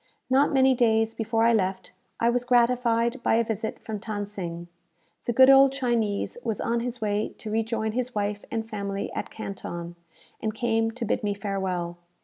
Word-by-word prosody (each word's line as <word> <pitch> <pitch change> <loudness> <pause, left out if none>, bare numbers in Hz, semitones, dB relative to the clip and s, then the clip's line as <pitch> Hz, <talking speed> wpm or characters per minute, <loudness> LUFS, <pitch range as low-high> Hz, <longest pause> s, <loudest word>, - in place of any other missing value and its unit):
Not 275 +2 +4
many 265 -1 +5
days 225 -2 +2
before 225 0 0
I 230 0 +5
left, 190 -3 -1 0.3
I 230 - +2
was 245 0 0
gratified 240 0 +2
by 225 - +2
a 230 - +3
visit 220 0 -3
from 215 -2 -6
Than 205 -1 -4
Sing. 175 -4 -6 0.6
The - - +1
good 260 +3 +7
old 270 0 +7
Chinese 240 -5 -1
was 225 -3 -2
on 235 0 0
his 240 0 -4
way 210 0 -1
to 215 - -7
rejoin 220 0 -1
his 245 +1 -3
wife 205 0 -2
and 225 -1 -3
family 200 -2 -4
at - - -4
Canton, 175 -5 -6 0.5
and 215 -1 -2
came 225 -1 +1
to 235 +1 -5
bid 225 - 0
me 205 -1 0
farewell. 190 -4 -3
225 Hz, 180 wpm, -26 LUFS, 205-240 Hz, 0.6 s, good